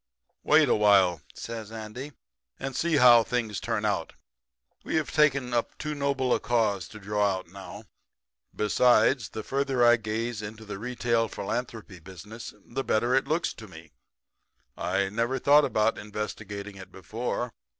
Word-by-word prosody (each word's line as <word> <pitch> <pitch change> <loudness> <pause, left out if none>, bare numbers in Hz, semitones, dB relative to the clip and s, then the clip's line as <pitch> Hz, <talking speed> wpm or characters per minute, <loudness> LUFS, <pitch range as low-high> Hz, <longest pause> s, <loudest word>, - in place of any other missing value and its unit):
"'Wait 155 0 +5
a - - +3
while,' 95 -5 +4
says 110 -2 -7
Andy, 115 +6 -7 0.5
'and 135 -1 -5
see 170 +2 +1
how 125 -4 +8
things 115 -2 -2
turn 110 -2 -2
out. 100 -6 -1 0.7
We - - -3
have 160 -1 0
taken 140 -5 +2
up 120 -1 -1
too 150 0 -4
noble 140 -3 0
a - - +1
cause 105 -7 0
to 105 - -11
draw 105 -1 0
out 95 - -10
now. 100 +3 -10 0.7
Besides, 120 +2 +3
the 110 - -6
further 135 -3 +1
I 120 0 +6
gaze 110 +1 -3
into 110 +1 -8
the 105 -2 -7
retail 115 -1 0
philanthropy 110 -3 -5
business 95 +6 -10
the 135 +3 -4
better 120 +2 +1
it 135 +1 +2
looks 160 +3 0
to 110 - -11
me. 80 -4 -13 0.8
I 95 +2 -1
never 115 +5 -1
thought 145 +2 +5
about 110 +1 +1
investigating 105 -1 -6
it 95 - -11
before. 115 +5 -4
115 Hz, 155 wpm, -27 LUFS, 105-125 Hz, 0.8 s, how